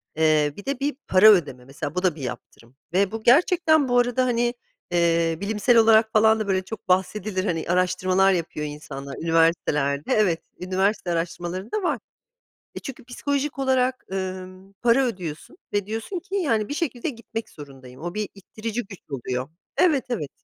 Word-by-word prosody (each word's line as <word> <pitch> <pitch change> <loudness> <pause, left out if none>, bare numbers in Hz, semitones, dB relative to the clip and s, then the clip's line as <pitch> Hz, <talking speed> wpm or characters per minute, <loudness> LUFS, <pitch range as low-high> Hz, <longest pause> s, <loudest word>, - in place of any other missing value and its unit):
eee, 155 -2 +3
bir 205 - -10
de 275 -2 -2
bir 285 0 -1
para 190 +3 +7
ödeme 145 -10 +1
mesela, 145 +4 -6
bu 180 - -1
da 180 -4 +2
bir 150 - -10
yaptırım 125 -1 -8 0.2
ve 195 +1 +2
bu 225 0 -5
gerçekten, 315 +1 +4
bu 245 0 +4
arada 245 +1 +2
hani, 240 -1 +1 0.4
eee, 165 -1 +2
bilimsel 220 +3 +2
olarak 220 0 +5
falan 220 0 +5
da 215 - -2
böyle 190 -1 +1
çok 220 0 -8
bahsedilir 185 +1 0
hani, 165 -4 -1
araştırmalar 185 +1 +3
yapıyor 165 -4 -2
insanlar 140 -2 -7
üniversitelerde. 160 -4 +1
Evet 185 -6 +2 0.2
üniversite 185 +1 0
araştırmalarında 175 - -3
var. 295 -9 0 0.8
E, - - -4
çünkü 265 -1 -8
psikolojik 280 +3 -2
olarak, 260 -1 +1
ımm, 185 0 -6
para 240 +3 +4
ödüyorsun 180 - -6 0.2
ve 205 -1 0
diyorsun 225 - -4
ki 380 +3 -7
yani, 230 - +1
bir - - -2
şekilde 290 -3 -2
gitmek 230 -3 -7
zorundayım. 135 -3 -12
O 175 +2 -4
bir 210 -1 -3
ittirici 220 +4 -5
güç 195 -2 -11
oluyor. 130 -1 -3 0.3
Evet, 295 -8 +3
evet. 180 - -2
195 Hz, 165 wpm, -24 LUFS, 165-240 Hz, 0.8 s, para